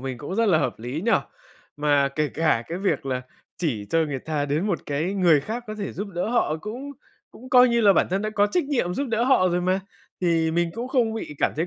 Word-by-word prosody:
mình 130 -2 -5
cũng 165 +8 -5
rất 230 +1 +2
là 160 - +4
hợp - - -2
lý 125 +7 -4
nhỉ? 230 - +4 0.6
Mà 145 -2 +2
kể 150 +2 -1
cả 155 -7 +1
cái 170 +2 -4
việc 165 -8 -1
là 130 -1 -2 0.4
chỉ 125 - -2
cho 165 - +2
người 140 -3 -3
ta 150 0 -2
đến 150 +7 -1
một 190 -5 0
cái 155 +7 -1
người 170 -6 +4
khác 235 - -5
có 215 - -5
thể 205 -2 -5
giúp 205 +2 -5
đỡ 180 +2 -3
họ 230 -10 +1
cũng 255 - -6 0.4
cũng 255 +2 -13
coi 250 0 +7
như 235 0 +2
là 205 -3 +6
bản - - +3
thân 190 +2 0
đã 215 - -2
có 205 -1 +2
trách 315 +11 0
nhiệm 245 -11 -1
giúp 280 +6 -2
đỡ 230 +1 +1
họ 250 -8 +4
rồi 175 0 0
mà. 185 +2 +1 0.4
Thì 165 -2 +2
mình 170 +1 0
cũng 235 +3 -4
không 240 -4 +1
bị 185 -9 -6
cảm - - +1
thấy 165 - 0
180 Hz, 255 wpm, -24 LUFS, 150-220 Hz, 0.6 s, coi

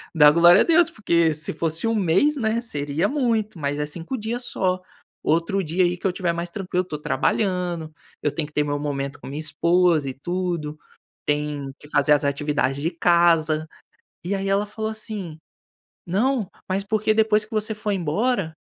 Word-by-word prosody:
dá 150 -2 +8
glória 170 +2 +7
a - - +6
Deus, 335 0 +4
porque 170 - +2
se 155 +1 -5
fosse 165 +4 -1
1 225 - +1
mês, 200 - +3
né, 225 -2 0
seria 145 -7 -1
muito, 230 - -1
mas 145 0 -2
é 150 - 0
5 165 - -5
dias 235 +3 -4
só. 185 -4 -1 0.4
Outro 170 +5 +1
dia 170 +3 +1
aí 175 0 0
que - - -12
eu 190 - +3
estiver 175 -1 -1
mais 170 +1 -4
tranquilo 180 -1 -2
estou 155 -5 -6
trabalhando, 175 -2 -1 0.3
eu 150 - 0
tenho 150 0 -3
que 150 - -20
ter 150 - +2
meu 145 0 -2
momento 140 -1 -3
com - - -9
minha 140 +3 -5
esposa 160 0 +2
e - - -5
tudo, 170 0 -3 0.5
tenho 145 -2 -2
que 150 - -16
fazer 145 0 +2
as 145 0 +2
atividades 140 -1 0
de 165 +3 0
casa". 165 -2 +3 0.6
E 190 - -1
aí 195 0 -3
ela 200 +1 +2
falou 220 +1 -4
assim: 215 -7 -6 0.7
"Não, 215 +3 0 0.2
mas 190 +1 0
porque 215 +1 +1
depois 215 -1 +3
que 215 - -26
você 215 0 -1
foi 210 -1 -2
embora, 190 +1 0
175 Hz, 185 wpm, -23 LUFS, 150-210 Hz, 0.7 s, dá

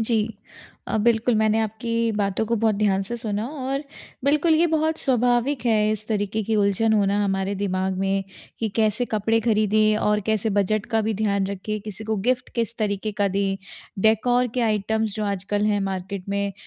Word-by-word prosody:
जी, 225 0 +2 0.7
अ, - - -1
बिल्कुल 235 +1 +3
मैंने 215 0 +2
आपकी 220 +2 -3 0.2
बातों 200 +1 0
को 230 +2 0
बहुत 220 -1 +3
ध्यान 200 -1 +1
से 235 +5 -5
सुना 215 -2 -3
और 275 0 -3 0.4
बिल्कुल 300 +3 +3
ये 330 +2 +4
बहुत 315 0 +1
स्वाभाविक 245 +1 +1
है 215 -2 +3
इस 215 0 -5
तरीके 215 0 -1
की 220 +1 0
उलझन 205 +2 +2
होना 205 -1 +2
हमारे 195 0 -1
दिमाग 190 -1 -1
में 195 0 0 0.4
कि 225 - 0
कैसे 215 +1 +2
कपड़े 225 +2 +2
खरीदें 215 -1 +3
और 210 0 +1
कैसे 220 0 +1
बजट 205 +1 0
का 225 - +4
भी 220 - 0
ध्यान 200 -2 0
रखें 200 +2 -4
किसी 210 +1 -8
को 220 0 -1
गिफ्ट 250 -1 +1
किस 235 0 -2
तरीके 210 0 -1
का 200 - +3
दें? 195 0 0 0.4
डेकोर 235 +4 +3
के 250 - 0
आइटम्स 220 -1 0
जो 215 - -2
आजकल 200 +1 -1
हैं 205 -1 +1
मार्केट 195 0 -4
में 200 0 -1
215 Hz, 185 wpm, -23 LUFS, 200-225 Hz, 0.7 s, ये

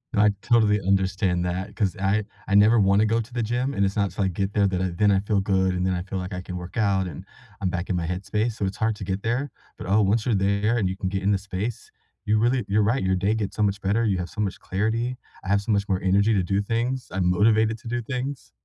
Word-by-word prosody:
I 105 0 +5
totally 110 -3 +3
understand 95 -1 +1
that, 95 +3 -4
'cause 100 -3 0
I 100 +2 +1 0.2
I 100 - +1
never 110 +3 +6
wanna 100 +1 +4
go 115 +1 +1
to 115 +2 -6
the 120 -2 -1
gym, 125 +5 -1
and 100 - 0
it's 95 - -2
not 100 -2 +1
till 100 - -2
I 95 - +2
get 95 +3 -2
there 100 -1 +3
that 95 -1 0
I 95 - 0
then 100 +4 +2
I 95 - +3
feel 100 0 0
good, 95 -1 +1
and 90 0 -1
then 95 - +1
I 90 - -2
feel 95 0 -5
like 90 +1 -5
I 90 - -4
can 90 0 -7
work 90 +6 -8
out, 100 -3 +1
and 80 - -8 0.4
I'm 95 - 0
back 90 0 -4
in 95 - 0
my 85 -2 -2
headspace, 105 +6 -1
so 100 - -3
it's 95 - -4
hard 110 0 0
to 100 - -7
get 95 +1 -3
there. 125 +5 -1 0.3
But, - - -7
oh, 105 +3 +3
once 105 +2 +1
you're 120 - +1
there 100 +4 +1
and 100 -5 +1
you 95 - -3
can 95 -1 -3
get 95 0 -3
in 100 - +2
the 100 - +3
space, 100 +3 -5 0.3
you 105 0 +2
really 120 +2 +2
You're 105 +2 +2
right. 115 +4 +1
Your 95 0 +2
day 100 +4 +1
gets 105 -3 -3
so 105 - 0
much 100 0 0
better, 105 +4 +1
you 100 -4 +1
have 90 -1 -4
so 105 - -5
much 100 -3 -2
clarity, 115 +6 -1 0.3
I 95 - -6
have 100 0 +3
so 105 +2 -3
much 100 0 +1
more 95 -1 0
energy 100 +4 +3
to 95 -3 +2
do 100 +3 0
things, 120 +5 -2
I'm 90 -1 +1
motivated 110 +4 +3
to 115 - -12
do 120 +1 -2
things. 130 +3 -5
100 Hz, 285 wpm, -24 LUFS, 95-110 Hz, 0.4 s, never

